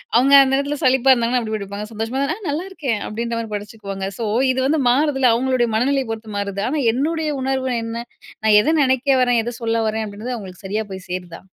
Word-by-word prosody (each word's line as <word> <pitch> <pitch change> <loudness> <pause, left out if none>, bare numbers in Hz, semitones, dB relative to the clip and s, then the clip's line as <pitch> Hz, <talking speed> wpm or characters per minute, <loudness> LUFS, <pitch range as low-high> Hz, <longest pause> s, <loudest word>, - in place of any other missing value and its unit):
அவங்க 265 +4 +4
அந்த 270 0 +1
எடத்துல 285 +1 -2
சலிப்பா 265 0 +4
இருந்தாங்கன்னா, 245 0 +1
அப்படி 220 -1 -3
படிப்பாங்க. 200 0 -6
சந்தோஷமா 225 +4 -3
இருந்தா 280 +4 0
'நான் 390 -6 -6
நல்லாயிருக்கேன்' 295 - -3
அப்படின்ற 235 +2 -4
மாரி 225 -1 -5
படிச்சுக்குவாங்க. 200 -2 -6
ஸோ 230 - -3 0.3
இது 260 - -1
வந்து 305 +1 +1
மாறுதில்ல. 270 -1 +3
அவங்களுடைய 250 -1 +1
மனநிலையை 265 +3 +1
பொறுத்து 220 -1 -6
மாறுது. 200 -1 -3
ஆனா 305 +3 -1
என்னுடைய 310 +4 -1
உணர்வு 265 -1 -1
என்ன? 230 +1 -5 0.4
நான் 215 -1 +6
எதை 310 +9 +1
நெனைக்க 260 +1 +2
வரேன்? 245 -2 +2
எதை 240 - -3
சொல்ல 225 0 0
வரேன்? 220 0 -2
அப்படின்றது 215 +5 -5
அவங்களுக்கு 190 -2 -10
சரியா 215 +3 -2
போய் 190 -1 -8
சேருதா? 180 -2 -6
235 Hz, 200 wpm, -20 LUFS, 215-270 Hz, 0.4 s, நான்